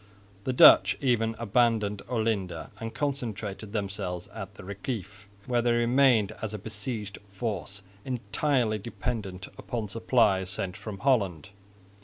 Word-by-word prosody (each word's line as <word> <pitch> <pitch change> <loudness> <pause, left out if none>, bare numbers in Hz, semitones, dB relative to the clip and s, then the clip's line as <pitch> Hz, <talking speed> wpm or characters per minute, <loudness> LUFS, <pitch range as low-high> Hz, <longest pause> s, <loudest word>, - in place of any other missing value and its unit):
The 130 - +1
Dutch 125 - +8
even 115 -4 +1
abandoned 110 -2 +1
Olinda 105 -8 -1
and 115 0 -4
concentrated 110 -8 -3
themselves 95 -4 -3
at 100 -2 -7
the 95 - -11
Reciff, 100 0 -6 0.2
where 120 -1 +1
they 120 0 +2
remained 120 -2 +4
as 110 -1 -3
a - - -3
besieged 105 0 -5
force 100 -1 -4 0.2
entirely 125 -2 0
dependent 105 -4 -4
upon 115 -4 -4
supplies 110 -4 +2
sent 95 -1 -2
from 105 -1 -7
Holland. 100 - +1
110 Hz, 125 wpm, -28 LUFS, 100-120 Hz, 0.2 s, Dutch